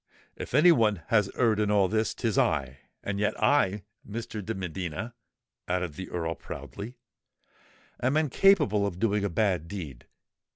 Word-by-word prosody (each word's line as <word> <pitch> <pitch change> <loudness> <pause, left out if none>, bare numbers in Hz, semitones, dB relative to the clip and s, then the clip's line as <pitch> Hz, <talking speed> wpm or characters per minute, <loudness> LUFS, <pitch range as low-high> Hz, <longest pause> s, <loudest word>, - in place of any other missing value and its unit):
If - - -5
any 155 +5 +7
one 105 - +2
has 105 -3 +3
erred 115 -4 +2
in 105 -1 +1
all 100 -2 +4
this, 110 +2 0
'tis 115 -5 -1
I; 70 -4 +1 0.2
and 100 0 -3
yet 105 - 0
I, 105 -9 +2 0.2
Mr. 110 -1 -6
de 115 +4 -4
Medina," 95 +4 -4 0.5
added 90 -3 -1
the 95 +5 -7
Earl 80 -2 -2
proudly, 110 +8 -8 1.0
"am 130 +5 +2
incapable 150 - +3
of 90 -3 -5
doing 105 0 +1
a 100 - 0
bad 90 -4 0
deed. 80 -10 -7
105 Hz, 155 wpm, -28 LUFS, 90-115 Hz, 1.0 s, any